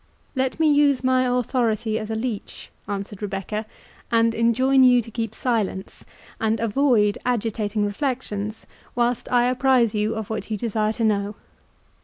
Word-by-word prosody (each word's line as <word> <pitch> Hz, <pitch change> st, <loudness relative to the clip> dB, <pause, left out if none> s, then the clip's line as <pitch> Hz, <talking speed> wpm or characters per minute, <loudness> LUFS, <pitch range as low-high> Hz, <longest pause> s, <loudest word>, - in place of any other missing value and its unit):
"Let 260 Hz, +2 st, -1 dB
me 320 Hz, -, +4 dB
use 285 Hz, -3 st, +3 dB
my 255 Hz, 0 st, +3 dB
authority 235 Hz, -3 st, 0 dB
as 215 Hz, -1 st, -6 dB
a 220 Hz, -, -2 dB
leech," 220 Hz, -2 st, -5 dB, 0.2 s
answered 200 Hz, 0 st, -5 dB
Rebecca, 205 Hz, +2 st, -4 dB, 0.4 s
"and 230 Hz, 0 st, +3 dB
enjoin 255 Hz, +4 st, +3 dB
you 250 Hz, -1 st, +6 dB
to 230 Hz, -1 st, -6 dB
keep 225 Hz, -1 st, -4 dB
silence, 215 Hz, -6 st, -2 dB, 0.4 s
and 220 Hz, 0 st, 0 dB
avoid 225 Hz, -2 st, +2 dB
agitating 215 Hz, -3 st, -1 dB
reflections, 215 Hz, -2 st, -3 dB, 0.3 s
whilst 240 Hz, 0 st, 0 dB
I 245 Hz, -1 st, +4 dB
apprize 250 Hz, -2 st, +3 dB
you 210 Hz, +1 st, 0 dB
of 220 Hz, -1 st, -5 dB
what 220 Hz, -1 st, -4 dB
you 215 Hz, -, -2 dB
desire 215 Hz, 0 st, -1 dB
to 230 Hz, -, -3 dB
know. 205 Hz, -1 st, 0 dB
225 Hz, 150 wpm, -23 LUFS, 210-250 Hz, 0.4 s, you